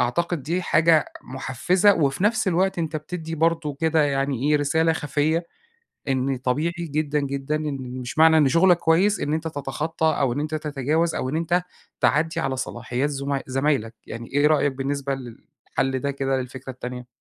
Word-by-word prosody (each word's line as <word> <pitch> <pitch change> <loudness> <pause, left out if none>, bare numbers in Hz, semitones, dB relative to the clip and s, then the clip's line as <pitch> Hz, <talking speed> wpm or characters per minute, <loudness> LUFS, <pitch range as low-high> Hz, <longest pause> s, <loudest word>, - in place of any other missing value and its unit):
أعتقد 170 +5 0
دي 175 +5 -1
حاجة 160 -3 +4 0.2
مُحفزة، 175 - +2
وفي 145 +4 0
نفس 215 -2 +2
الوقت 185 +1 +1
أنت 160 -1 -2
بتدّي 165 +1 -5
برضه 165 -2 +1
كده 160 -1 +3
يعني 135 -1 0
إيه 150 - +5
رسالة 160 +3 +2
خَفية 155 +2 0 0.6
إن 135 0 0
طبيعي 140 +7 0
جدًا 150 -2 -1
جدًا 140 +2 -2
إن 150 -3 -3 0.2
مش 125 +5 -6
معنى 160 0 +7
إن 145 -3 +4
شُغلك 175 +4 +5
كويس 180 +6 +3
إن 150 +1 0
أنت 160 +1 -2
تتخطى، 155 +3 -3
أو 130 -3 +2
إن 145 - -2
أنت 155 +1 -3
تتجاوز 155 +2 0
أو 130 - -2
إن 155 - -2
أنت 175 +2 +1 0.4
تعدّي 160 +2 +2
على 135 -1 -1
صلاحيات 125 +2 -2
زُما 140 0 -2
زمايلك 130 -4 0
يعني 115 +1 -7
إيه 145 +1 +3
رأيك 145 -2 +3
بالنسبة 140 +1 -2
للحل 130 +1 -4
ده 140 +1 -1
كده 135 -1 -1
للفكرة 130 +1 -7
التانية؟ 125 0 -7
145 Hz, 170 wpm, -24 LUFS, 135-160 Hz, 0.6 s, معنى